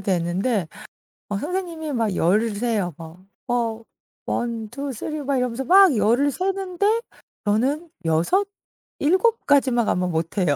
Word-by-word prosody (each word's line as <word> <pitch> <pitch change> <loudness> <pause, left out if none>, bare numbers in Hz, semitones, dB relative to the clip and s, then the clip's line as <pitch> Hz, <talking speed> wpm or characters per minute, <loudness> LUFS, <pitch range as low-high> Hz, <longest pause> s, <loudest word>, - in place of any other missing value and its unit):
되는데 190 +2 0 0.6
어 205 - -2
선생님이 330 - -4
막 225 -6 0
10 180 +7 +3
을 225 -2 -2
세요 210 -5 -1
뭐. 165 +3 -12 0.2
어. 230 -2 -1 0.4
1 230 -2 -2
2 280 +3 -5
3 305 +6 -5
이러면서 265 -3 -1
막 375 -3 +7
10 225 +4 +3
을 285 0 +2
세는데 390 - 0 0.4
저는 265 +11 0 0.2
6 170 - +2 0.5
7 380 +10 +2
까지만 260 -5 +3
가면 180 0 0
못 165 +3 -3
해요. 175 -7 +2
240 Hz, 190 characters per minute, -23 LUFS, 200-310 Hz, 0.6 s, 막